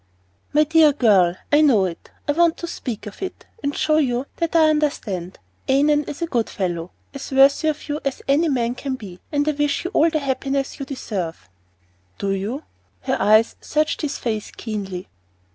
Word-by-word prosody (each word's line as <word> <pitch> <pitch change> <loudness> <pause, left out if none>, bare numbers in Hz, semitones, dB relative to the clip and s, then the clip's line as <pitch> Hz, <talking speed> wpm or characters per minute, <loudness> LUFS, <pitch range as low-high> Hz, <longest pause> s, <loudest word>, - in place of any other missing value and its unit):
"My 300 +1 +5
dear 310 -1 +5
girl, 195 -9 +4 0.2
I 295 +1 +6
know 240 -11 +5
it. 170 -2 -6 0.2
I - - +3
meant 335 +2 +3
to - - -5
speak 245 -9 -5
of 210 - -10
it, 380 - -6 0.2
and 285 - -2
show 310 0 +2
you 255 -3 +1
that 335 0 -2
I 320 -1 +6
understand. 210 - -2 0.3
Annon 295 +2 +3
is 290 +3 -5
a - - +2
good 240 -9 -1
fellow, 175 -3 -3 0.2
as 275 0 -7
worthy 275 +3 +5
of 305 -1 -2
you 295 0 -2
as 275 -2 -3
any 300 +4 +3
man 240 -3 0
can 265 +1 -4
be, 195 -7 -10
and 290 0 +1
I - - +4
wish 295 -1 0
you 360 - -2
all 330 - +4
the 315 - 0
happiness 275 -1 -2
you 275 - -5
deserve." 185 - -5 0.7
"Do 200 - -1
you?" 210 +10 -3 0.4
And - - 0
her - - -5
eyes 215 +2 +4
searched 305 0 0
his 295 -2 -2
face 220 -3 -3
keenly. 195 -5 -5
275 Hz, 195 wpm, -22 LUFS, 215-300 Hz, 0.7 s, I